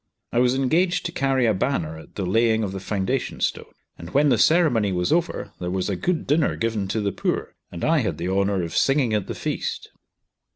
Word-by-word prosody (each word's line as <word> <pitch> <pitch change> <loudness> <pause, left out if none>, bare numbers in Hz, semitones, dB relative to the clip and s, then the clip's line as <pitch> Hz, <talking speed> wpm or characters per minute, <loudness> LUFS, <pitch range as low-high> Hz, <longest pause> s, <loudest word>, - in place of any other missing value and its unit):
I 120 - +1
was 125 +1 +3
engaged 170 +7 +1
to - - -2
carry 135 -2 +1
a 110 - +3
banner 90 - -1
at 80 - -16
the 100 - -2
laying 110 +3 +2
of 100 - -2
the 95 - -5
foundation 95 0 -2
stone; - - -2 0.3
and 85 - -8
when 145 +7 +3
the 125 - +3
ceremony 135 - +3
was 90 +4 0
over 170 +1 -1
there 90 - -3
was 95 +2 -1
a - - -1
good 170 - -1
dinner 150 +2 +2
given 110 -4 -1
to 110 +3 -1
the 100 -1 0
poor, - - -2 0.2
and 85 - -4
I 160 0 +3
had 105 - -2
the 85 +2 -3
honour 100 -1 +1
of 85 - -5
singing 135 -5 +2
at 105 -3 0
the - - -4
feast. - - -4
110 Hz, 220 wpm, -23 LUFS, 95-135 Hz, 0.3 s, was